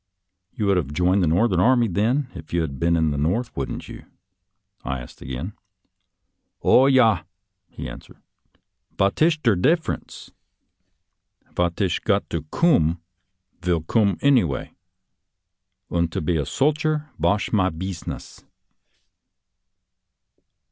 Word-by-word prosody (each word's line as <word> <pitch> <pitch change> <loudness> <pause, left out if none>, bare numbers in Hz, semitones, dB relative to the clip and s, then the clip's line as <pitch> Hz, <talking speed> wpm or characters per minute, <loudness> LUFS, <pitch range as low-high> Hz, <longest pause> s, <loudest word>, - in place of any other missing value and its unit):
" 90 0 -56
You 110 -5 -1
would 100 -2 +3
have 75 -6 -2
joined 90 +4 +2
the 85 - +2
Northern 90 +3 +2
Army, 120 +3 +4
then, 115 +9 0
if 80 - -11
you 85 - +2
had 70 -4 -4
been 85 0 +2
in 80 -2 +1
the 70 - -2
North, 95 +11 -1
wouldn't 70 - -4
you? - - -10 0.4
" - - -47
I 65 - -3
asked - - -12
again. 65 +10 -5 0.6
" - - -54
Oh, 130 +2 +6
yah," 115 -9 +4 0.5
he - - -7
answered. - - -11 0.8
"Vot 100 +7 +1
ish 160 -1 +4
der 115 - +4
def 160 - +2
ranee? - - -6 1.2
Vat 85 +1 -1
ish 95 -5 +1
got - - 0
to 85 - -1
coom, 85 - +2 0.6
vill 90 -2 0
coom 100 +1 +2
anyvay, 115 - +2 1.2
und 85 -1 0
to - - -1
be 85 +2 0
a 75 -3 0
solcher 155 +1 0
vash 100 +2 +1
my 95 -3 +3
beezness." 90 +1 -7
90 Hz, 140 wpm, -23 LUFS, 85-120 Hz, 1.2 s, Oh